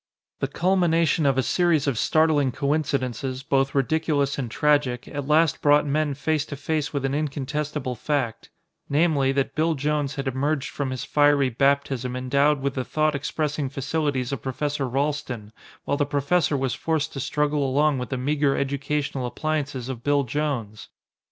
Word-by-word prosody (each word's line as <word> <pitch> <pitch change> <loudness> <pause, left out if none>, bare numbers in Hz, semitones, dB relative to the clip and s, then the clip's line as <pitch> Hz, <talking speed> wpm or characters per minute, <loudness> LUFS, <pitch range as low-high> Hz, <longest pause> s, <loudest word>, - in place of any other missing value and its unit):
The 135 - 0
culmination 165 -1 +2
of 135 -1 +2
a 130 - +3
series 170 +2 +2
of 140 -3 0
startling 150 +1 +2
coincidences, 135 -3 -1
both 135 0 +1
ridiculous 145 0 +1
and 125 -4 -3
tragic, 140 -2 +1
at 140 -1 -5
last 155 +1 +3
brought 145 0 +4
men 145 0 0
face 155 +1 0
to 140 - -6
face 145 +1 -2
with 140 -2 -2
an 135 - -1
incontestable 145 -1 -2
fact: 125 -2 -2 0.4
namely, 145 -3 +2
that 135 0 0
Bill 160 +2 +1
Jones 145 -1 -1
had 140 -1 -4
emerged 140 +2 -1
from 140 -2 -3
his 130 -1 -4
fiery 145 -3 +3
baptism 135 -1 +1
endowed 140 +3 +2
with 140 -1 -1
the 130 - -2
thought 155 +3 +1
expressing 145 0 -2
facilities 140 -2 -1
of 135 -5 -3
Professor 140 +1 -2
Ralston, 135 -5 -2 0.3
while 140 - 0
the 145 - +1
professor 145 +1 +1
was 135 -1 -1
forced 160 -1 -1
to 135 - -5
struggle 150 +2 0
along 140 +1 +2
with 125 -3 -5
the 130 - -2
meager 140 +1 +1
educational 140 -1 -2
appliances 145 -3 -3
of 125 -3 -6
Bill 145 -1 +2
Jones! 125 -6 -3
140 Hz, 165 wpm, -24 LUFS, 135-150 Hz, 0.4 s, brought